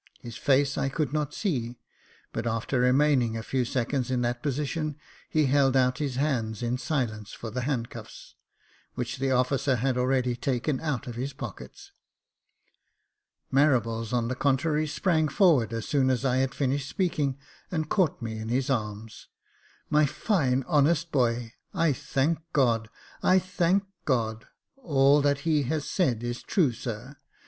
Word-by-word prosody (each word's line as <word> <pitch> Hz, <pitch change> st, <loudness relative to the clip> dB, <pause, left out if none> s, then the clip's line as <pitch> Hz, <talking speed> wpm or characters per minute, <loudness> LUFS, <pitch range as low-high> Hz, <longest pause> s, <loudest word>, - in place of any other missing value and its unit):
His 120 Hz, -2 st, -9 dB
face 140 Hz, 0 st, +2 dB
I 135 Hz, -, 0 dB
could 145 Hz, -1 st, -2 dB
not 150 Hz, -1 st, -1 dB
see, 125 Hz, -, -2 dB, 0.6 s
but 115 Hz, -, -2 dB
after 115 Hz, +3 st, -1 dB
remaining 125 Hz, -2 st, +3 dB
a 110 Hz, -, -5 dB
few 130 Hz, +2 st, 0 dB
seconds 125 Hz, +1 st, -1 dB
in 125 Hz, -1 st, 0 dB
that 120 Hz, 0 st, -1 dB
position, 150 Hz, +2 st, -2 dB, 0.3 s
he 155 Hz, -1 st, +2 dB
held 135 Hz, -1 st, +3 dB
out 125 Hz, 0 st, +2 dB
his 140 Hz, -4 st, -2 dB
hands 120 Hz, -6 st, -1 dB
in 120 Hz, +1 st, -1 dB
silence 115 Hz, -9 st, -2 dB
for 115 Hz, -, -7 dB
the 125 Hz, +3 st, -2 dB
handcuffs, 120 Hz, -3 st, -5 dB, 0.6 s
which 125 Hz, +1 st, -4 dB
the 135 Hz, 0 st, 0 dB
officer 130 Hz, +1 st, +2 dB
had 125 Hz, +1 st, 0 dB
already 125 Hz, -1 st, +1 dB
taken 130 Hz, +2 st, -1 dB
out 145 Hz, -4 st, -2 dB
of 120 Hz, -, -6 dB
his 135 Hz, +3 st, -3 dB
pocket. 65 Hz, -, -9 dB, 1.6 s
Marables, 115 Hz, -6 st, +2 dB
on 120 Hz, -2 st, +1 dB
the 130 Hz, -, -1 dB
contrary, 150 Hz, +4 st, +1 dB
sprang 160 Hz, 0 st, +1 dB
forward 150 Hz, -, +3 dB
as 115 Hz, -1 st, -4 dB
soon 135 Hz, -4 st, +2 dB
as 130 Hz, 0 st, 0 dB
I 130 Hz, -1 st, +2 dB
had 135 Hz, 0 st, 0 dB
finished 140 Hz, 0 st, -1 dB
speaking, 150 Hz, -8 st, 0 dB, 0.3 s
and 160 Hz, -3 st, -2 dB
caught 170 Hz, -, +1 dB
me 110 Hz, -1 st, -4 dB
in 110 Hz, +1 st, -5 dB
his 130 Hz, +3 st, 0 dB
arms. 110 Hz, -2 st, -4 dB, 0.3 s
" -, -, -33 dB
My 150 Hz, -1 st, +4 dB
fine, 135 Hz, -, +1 dB
honest 165 Hz, +2 st, +2 dB
boy! 120 Hz, -3 st, 0 dB, 0.2 s
I 165 Hz, -3 st, +3 dB
thank 140 Hz, +5 st, 0 dB
God 115 Hz, -5 st, +2 dB, 0.2 s
— -, -, -23 dB
I 185 Hz, -, +5 dB
thank 185 Hz, +1 st, +1 dB, 0.2 s
God! 115 Hz, -4 st, -1 dB, 0.3 s
All 145 Hz, -, +4 dB
that 145 Hz, 0 st, +1 dB
he 155 Hz, -2 st, +2 dB
has 150 Hz, +3 st, -2 dB
said 125 Hz, -, 0 dB
is 120 Hz, 0 st, -3 dB
true, 160 Hz, -10 st, +2 dB
sir. 120 Hz, +3 st, -7 dB
130 Hz, 160 wpm, -27 LUFS, 120-150 Hz, 1.6 s, I